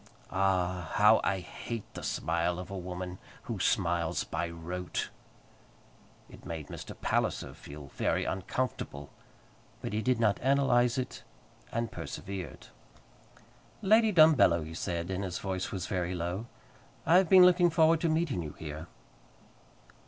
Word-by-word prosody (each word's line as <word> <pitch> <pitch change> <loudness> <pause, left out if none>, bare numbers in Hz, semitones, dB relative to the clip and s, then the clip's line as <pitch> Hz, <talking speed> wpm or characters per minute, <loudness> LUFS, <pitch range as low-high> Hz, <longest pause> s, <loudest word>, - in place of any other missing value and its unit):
Ah! 90 -3 0
how - - +6
I 95 -1 0
hate 110 +5 -6
the - - -7
smile 85 +1 -1
of 90 +1 -7
a - - -4
woman 90 0 -5 0.2
who - - -4
smiles 85 0 +1
by 85 - -3
rote! 85 +2 -4 1.2
It - - -14
made 80 -3 -6
Mr. - - -8
Palliser - - -1
feel 70 -1 -11
very - - 0
uncomfortable; 95 - -3 0.7
but - - -5
he 110 - 0
did 125 0 +1
not 105 -3 +2
analyze 130 -2 +3
it, 130 -1 -4 0.5
and 115 -1 -2
persevered. 95 -2 -6 1.2
"Lady 220 +2 +5
Dumbello," 155 - +6
he 80 - -8
said, 85 0 -3
and 95 +1 -2
his 90 -2 -3
voice 95 -1 -3
was 95 - -3
very 90 -2 -2
low, 90 +6 -3 0.6
"I 170 - +6
have 185 -3 +3
been 185 -1 +9
looking 180 -1 +5
forward 160 -1 +4
to 170 - +2
meeting 155 - 0
you 75 -3 -6
here." 75 +1 -7
95 Hz, 140 wpm, -30 LUFS, 85-130 Hz, 1.2 s, been